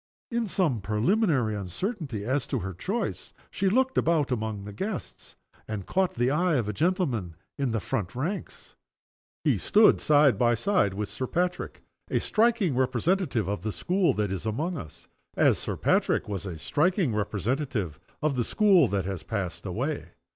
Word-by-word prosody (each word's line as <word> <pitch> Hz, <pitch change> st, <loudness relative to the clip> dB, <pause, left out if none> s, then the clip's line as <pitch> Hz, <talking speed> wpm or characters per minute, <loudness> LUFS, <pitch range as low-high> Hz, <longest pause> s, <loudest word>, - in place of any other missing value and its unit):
In 235 Hz, -1 st, 0 dB
some 160 Hz, -, +1 dB
preliminary 120 Hz, -, +1 dB
uncertainty 115 Hz, -, -4 dB
as 130 Hz, +3 st, 0 dB
to -, -, -1 dB
her 95 Hz, +1 st, -4 dB
choice 200 Hz, -, -3 dB, 0.2 s
she 195 Hz, 0 st, +1 dB
looked 260 Hz, +5 st, +2 dB
about 160 Hz, -5 st, +1 dB
among 110 Hz, -4 st, -2 dB
the 100 Hz, 0 st, -8 dB
guests, 195 Hz, -, -5 dB, 0.3 s
and 105 Hz, -4 st, -4 dB
caught 190 Hz, -1 st, 0 dB
the 120 Hz, +2 st, +1 dB
eye 170 Hz, +2 st, +2 dB
of 120 Hz, -6 st, 0 dB
a 105 Hz, -, -2 dB
gentleman 130 Hz, -, 0 dB, 0.2 s
in 140 Hz, -2 st, -1 dB
the 115 Hz, -1 st, 0 dB
front 100 Hz, -1 st, -3 dB
ranks. 165 Hz, +11 st, -5 dB, 0.7 s
He -, -, +2 dB
stood 215 Hz, +1 st, +5 dB
side 145 Hz, -7 st, +4 dB
by 120 Hz, -1 st, +4 dB
side 115 Hz, -, +1 dB
with 105 Hz, 0 st, -2 dB
Sir 130 Hz, -, -4 dB
Patrick 180 Hz, +4 st, -2 dB, 0.3 s
a -, -, +1 dB
striking 220 Hz, -, +2 dB
representative 130 Hz, -, +1 dB
of 100 Hz, -3 st, -2 dB
the 110 Hz, +3 st, -2 dB
school 180 Hz, -, +1 dB
that 105 Hz, -2 st, -1 dB
is 95 Hz, +2 st, -3 dB
among 155 Hz, +12 st, -1 dB
us 80 Hz, -, -9 dB, 0.3 s
as -, -, +4 dB
Sir -, -, -4 dB
Patrick -, -, +2 dB
was 100 Hz, -2 st, -4 dB
a 85 Hz, -3 st, -5 dB
striking 160 Hz, -, +1 dB
representative 105 Hz, -, -2 dB, 0.2 s
of 155 Hz, -3 st, +1 dB
the 125 Hz, -, +1 dB
school 190 Hz, -, +4 dB
that 100 Hz, -3 st, -1 dB
has 95 Hz, -3 st, -4 dB
passed 100 Hz, -6 st, -4 dB
away. -, -, -3 dB
130 Hz, 170 wpm, -27 LUFS, -, 0.7 s, stood